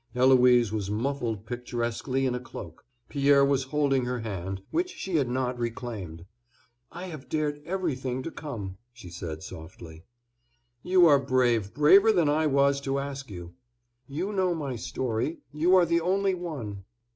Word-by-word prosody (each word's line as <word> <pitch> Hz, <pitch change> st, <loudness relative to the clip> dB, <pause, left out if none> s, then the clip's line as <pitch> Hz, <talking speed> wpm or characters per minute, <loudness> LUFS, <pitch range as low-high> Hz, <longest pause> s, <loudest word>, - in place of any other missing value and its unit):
Eloise 125 Hz, -3 st, +5 dB
was 105 Hz, -3 st, -3 dB
muffled 115 Hz, -1 st, -2 dB
picturesquely 120 Hz, +2 st, -2 dB
in 130 Hz, -, +1 dB
a 125 Hz, -, -2 dB
cloak. 85 Hz, -9 st, -10 dB, 0.2 s
Pierre 140 Hz, -1 st, +4 dB
was 140 Hz, -1 st, +1 dB
holding 135 Hz, -2 st, +1 dB
her 125 Hz, -1 st, -2 dB
hand, 95 Hz, -3 st, -5 dB
which 355 Hz, +2 st, 0 dB
she 190 Hz, -, -3 dB
had 135 Hz, -5 st, +1 dB
not 125 Hz, 0 st, -1 dB
reclaimed. 110 Hz, -8 st, -5 dB, 0.7 s
"I 175 Hz, +2 st, -7 dB
have 150 Hz, -8 st, -9 dB
dared 150 Hz, -1 st, -1 dB
everything 135 Hz, -9 st, -2 dB
to 165 Hz, -, -5 dB
come," 105 Hz, -14 st, -6 dB, 0.2 s
she 115 Hz, -8 st, -12 dB
said 80 Hz, -2 st, -6 dB
softly. 80 Hz, -1 st, -10 dB, 0.8 s
"You 180 Hz, -1 st, +5 dB
are 145 Hz, -4 st, +6 dB
brave, 125 Hz, -6 st, +1 dB
braver 195 Hz, +9 st, +6 dB
than 175 Hz, -7 st, +3 dB
I 155 Hz, +1 st, +2 dB
was 140 Hz, 0 st, +3 dB
to 135 Hz, 0 st, -1 dB
ask 140 Hz, -1 st, -5 dB
you." 90 Hz, -3 st, -9 dB, 0.5 s
"You 175 Hz, +9 st, -3 dB
know 185 Hz, -3 st, +1 dB
my 140 Hz, -5 st, -4 dB
story. 125 Hz, +4 st, -2 dB, 0.2 s
You 170 Hz, +5 st, +4 dB
are 180 Hz, -2 st, +6 dB
the 170 Hz, 0 st, +1 dB
only 195 Hz, +3 st, +1 dB
one." 135 Hz, -, -6 dB
130 Hz, 155 wpm, -27 LUFS, 115-155 Hz, 0.8 s, are